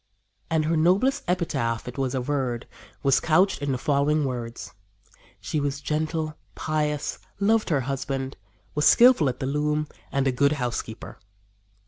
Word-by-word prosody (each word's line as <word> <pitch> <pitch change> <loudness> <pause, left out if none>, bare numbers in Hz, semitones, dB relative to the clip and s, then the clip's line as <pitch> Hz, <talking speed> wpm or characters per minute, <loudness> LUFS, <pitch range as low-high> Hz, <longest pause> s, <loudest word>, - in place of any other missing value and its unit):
And 160 -1 +1
her 165 +2 +1
noblest 190 - +3
epitaph, 120 -11 -1
it 125 - -6
was 135 -1 -1
averred, 130 -2 -2 0.4
was 135 -2 +4
couched 180 +4 +2
in 145 -1 -1
the 130 - 0
following 145 +2 +1
words: 120 -3 -5 0.7
"She 155 - -2
was 140 -1 -2
gentle, 155 +2 -2 0.2
pious, 150 -1 -1 0.2
loved 215 +1 +2
her 145 -5 +2
husband, 135 0 -3 0.4
was 150 - +3
skillful 235 - +6
at 125 - -5
the - - -2
loom 150 +2 0 0.2
and 140 0 +1
a 135 - +3
good 140 +3 +2
housekeeper." 120 -5 -4
145 Hz, 145 wpm, -25 LUFS, 135-155 Hz, 0.7 s, skillful